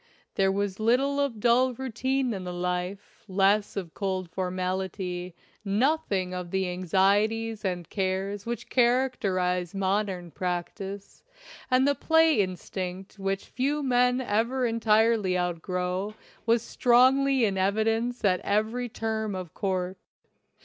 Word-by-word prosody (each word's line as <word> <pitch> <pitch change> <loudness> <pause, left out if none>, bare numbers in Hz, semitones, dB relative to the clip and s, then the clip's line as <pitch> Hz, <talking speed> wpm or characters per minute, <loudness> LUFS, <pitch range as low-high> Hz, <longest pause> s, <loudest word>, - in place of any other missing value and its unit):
There 195 0 +2
was 200 0 -2
little 265 +6 +2
of 275 -6 -1
dull 245 +3 +3
routine 260 +1 -1
in 190 -2 -5
the 180 - -5
life, 180 +2 -4
less 200 +2 +2
of 175 -5 -4
cold 190 -3 -3
formality, 185 -1 -3 0.3
nothing 205 -3 0
of 180 -1 -5
the 190 +1 0
anxieties 205 +5 +1
and 180 -4 -2
cares 195 +1 -2
which 235 +2 -5
characterize 200 -8 +1
modern 190 -2 -1
practice, 190 +3 -5 0.5
and 255 +1 +4
the 285 - +4
"play 320 -2 +3
instinct," 185 +1 -5
which 195 0 -2
few 285 +3 -1
men 250 -1 +3
ever 245 +2 0
entirely 220 -4 +2
out 175 -2 -1
grow, 180 +3 -2 0.3
was 230 0 +3
strongly 260 +1 +4
in 200 -2 0
evidence 225 +5 0
at 185 -2 +3
every 220 +4 -1
term 220 -2 -2
of 180 -3 -6
court. 185 -1 -2
200 Hz, 125 wpm, -27 LUFS, 185-240 Hz, 0.5 s, and